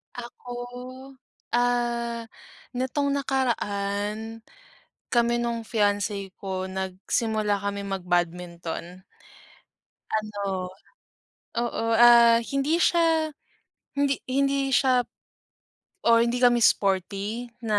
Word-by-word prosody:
Ako, 245 0 -9 1.1
ah, 235 -1 0 0.5
nitong 280 +3 0
nakaraan 220 -4 -2 0.7
kami 235 0 +3
nung 235 -1 -2
fiance 205 -3 -1
ko 190 -1 -3
nagsimula 200 +3 -1
kami 200 0 -3
mag-badminton. 175 -1 -3 1.1
Ano 200 -4 -2 0.9
oo, 235 -1 -1
ah, 235 0 +7
hindi 275 +4 +1
siya 325 -2 +3 0.7
hindi 280 -1 +1
hindi 275 0 +1
siya 255 -1 +4 1.0
or 230 0 +6
hindi 235 +1 0
kami 240 -1 +5
sporty 200 +5 +1 0.2
na 215 -2 +2
225 Hz, 80 wpm, -26 LUFS, 200-245 Hz, 1.1 s, ah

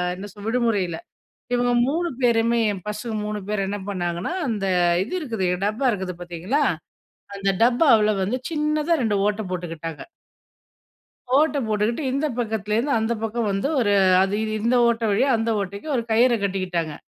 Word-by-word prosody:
என்ன 200 +3 -8
சொல்றது 205 +1 -9
விடுமுறையில 220 -8 0 0.6
இவங்க 245 0 +2 0.2
3 340 +5 0
பேருமே 235 -1 +3 0.3
பசங்கக்கு 210 +1 -4
3 210 0 -3
பேர் 210 -2 0
என்ன 205 +1 -3
பண்ணாங்கன்னா, 175 - -2 0.2
அந்த 210 -4 -2 0.4
இது 220 - -5
இருக்குது, 225 - -2 0.2
டப்பா 220 +6 -1
இருக்குது 190 -3 -4
பார்த்தீங்களா 175 - -2 0.7
அந்த 195 0 0
டப்பாவில 235 -4 +5
வந்து 205 +7 0
சின்னதா 305 +1 0
2 215 -3 +1
ஓட்டை 210 +1 0
போட்டுக்கிட்டாங்க. 165 -3 -5 1.3
ஓட்ட 300 +1 +3
போட்டுக்ட்டு 215 +6 0
இந்த 275 +4 0
பக்கத்துலருந்து 220 +3 -1
அந்த 220 +1 0
பக்கம் 225 0 -1
வந்து, 195 +7 -1
ஒரு 205 -4 +2 0.3
அது 195 +1 0 0.2
இந்த 235 +4 +1
ஓட்ட 235 0 0
வழியா 235 +7 +2
அந்த 225 +1 -1
ஓட்டைக்கு 200 +8 -6
ஒரு 235 - 0
கயிற 240 +2 +4
கட்டிக்கிட்டாங்க 180 -5 -2
215 Hz, 145 wpm, -23 LUFS, 195-245 Hz, 1.3 s, டப்பாவில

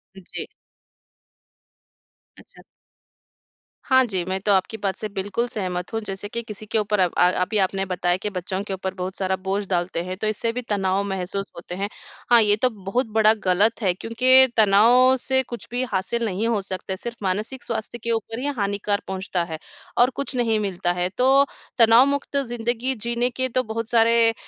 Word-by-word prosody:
जी। 190 -2 -8 1.9
अच्छा। - - -18 1.2
हाँ 260 -1 +5
जी, 190 -6 -1
मैं 190 0 -1
तो 205 - +1
आपकी 195 +3 0
बात 195 -3 -2
से 215 - -4
बिल्कुल 205 +4 -2
सहमत 185 -6 -4
हूँ 225 - 0
जैसे 195 +1 -4
कि 235 - -3
किसी 215 -1 -9
के 215 - -1
ऊपर 210 -1 0
अब 180 -2 +3
अ, 180 - +5
अभी 205 +4 0
आपने 195 0 0
बताया 180 -1 0
कि 210 - -4
बच्चों 185 0 -4
के 200 - -5
ऊपर 190 0 -4
बहुत 185 0 -5
सारा 190 -1 0
बोझ 195 +2 -3
डालते 175 -2 -1
हैं 185 +1 -5
तो 215 - 0
इससे 215 +2 -1
भी 250 - -3
तनाव 195 -1 +1
महसूस 195 +1 -3
होते 175 +1 -8
हैं। 200 +2 -3 0.4
हाँ, 235 - +8
ये 205 -1 +4
तो 250 +4 +2
बहुत 220 +3 -2
बड़ा 215 0 +6
गलत 200 +6 +2
है 185 -3 +2
क्योंकि 255 +6 +5
तनाव 230 +5 +5
से 265 +1 +2
कुछ 240 -1 -8
भी 245 +1 -1
हासिल 230 +5 -1
नहीं 210 +2 -1
हो 230 -3 +1
सकता, 190 0 -5
सिर्फ़ 235 +4 -7
मानसिक 210 +7 -2
स्वास्थ्य 225 0 -4
के 235 - -1
ऊपर 225 0 -3
ही 260 - -4
हानिकार 200 0 -1
पहुँचता 190 -2 -2
है 160 -2 -6 0.4
और 245 +1 +5
कुछ 280 -1 -4
नहीं 230 -3 +1
मिलता 185 -4 -1
है। 180 0 -1
तो, 270 +2 +5 0.3
तनाव 230 +1 +7
मुक्त 280 0 -1
ज़िंदगी 240 0 -1
जीने 235 +2 -1
के 260 +1 -2
तो 255 +1 0
बहुत 225 0 -4
सारे 230 -1 +4
210 Hz, 190 wpm, -23 LUFS, 190-235 Hz, 1.9 s, हाँ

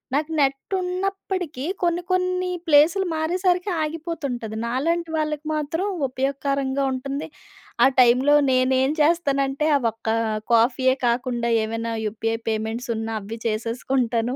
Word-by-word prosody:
నాకు 300 +2 -1
నెట్ 275 +5 0
ఉన్నప్పటికీ 365 -5 -3 0.2
కొన్ని 345 0 +1
కొన్ని 365 0 0 0.2
ప్లేసులు 320 +6 +5
మారేసరికి 355 +4 0
ఆగిపోతుంటది. 300 -8 -4
నాలాంటి 330 +8 -1
వాళ్ళకి 305 0 -2
మాత్రం 310 +5 -2 0.2
ఉపయోగకరంగా 275 +1 -1
ఉంటుంది. 275 +3 -4 0.6
ఆ - - +8
టైంలో 255 +4 +5 0.2
నేనేం 260 +1 +2
చేస్తానంటే, 290 -2 +1
ఆ - - -3
ఒక్క 225 +1 -14 0.5
కాఫీయే 255 +3 +3
కాకుండా 240 0 0 0.2
ఏమైనా 230 +1 -3
యూపీఐ 225 +1 -2
పేమెంట్స్ 220 +2 -3
ఉన్నా 225 0 -3
అవి 225 +3 -7
చేసేసుకుంటను. 235 +2 -1
275 Hz, 115 wpm, -23 LUFS, 240-325 Hz, 0.6 s, ఆ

